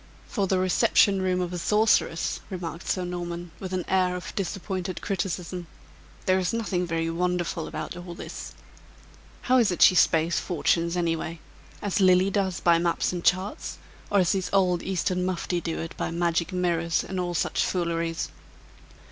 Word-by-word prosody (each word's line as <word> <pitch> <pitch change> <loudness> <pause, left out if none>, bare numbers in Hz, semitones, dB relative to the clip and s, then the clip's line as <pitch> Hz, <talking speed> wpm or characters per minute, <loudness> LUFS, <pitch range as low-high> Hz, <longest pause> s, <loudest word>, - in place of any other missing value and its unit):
"For 200 -4 -1
the 190 - +2
reception 190 +1 +3
room 185 -1 +1
of 180 0 -3
a 175 - -3
sorceress," 210 -4 +2
remarked 170 -3 -6
Sir 185 -1 0
Norman, 175 -1 -5
with 190 -1 -6
an 185 -2 -2
air 185 -1 +2
of 180 0 -6
disappointed 190 -1 -3
criticism, 180 -2 -3 0.6
"there 185 0 +3
is 185 +4 -1
nothing 195 -6 -1
very 165 0 -1
wonderful 175 -1 -1
about - - -5
all 175 -1 -8
this. - - -7 0.9
How 255 0 +4
is 225 -4 +4
it 180 - +3
she - - +8
spaes 165 -1 +3
fortunes 170 0 0
any 170 -2 +1
way? 165 +1 -5 0.4
As 205 0 0
Lilly 185 +1 +5
does 190 -3 0
by 170 -1 +4
maps 170 +1 0
and 175 -1 -4
charts; 185 +3 0 0.3
or 205 - +2
as 175 - +2
these 190 -2 -1
old 185 -3 +3
Eastern 180 -1 -1
mufti 180 -1 -1
do 165 -1 -3
it 165 - -5
by - - -2
magic 170 +1 0
mirrors 170 -2 0
and 190 -1 -4
all 175 -1 -1
each - - 0
fooleries?" 170 -2 -1
180 Hz, 170 wpm, -26 LUFS, 170-185 Hz, 0.9 s, she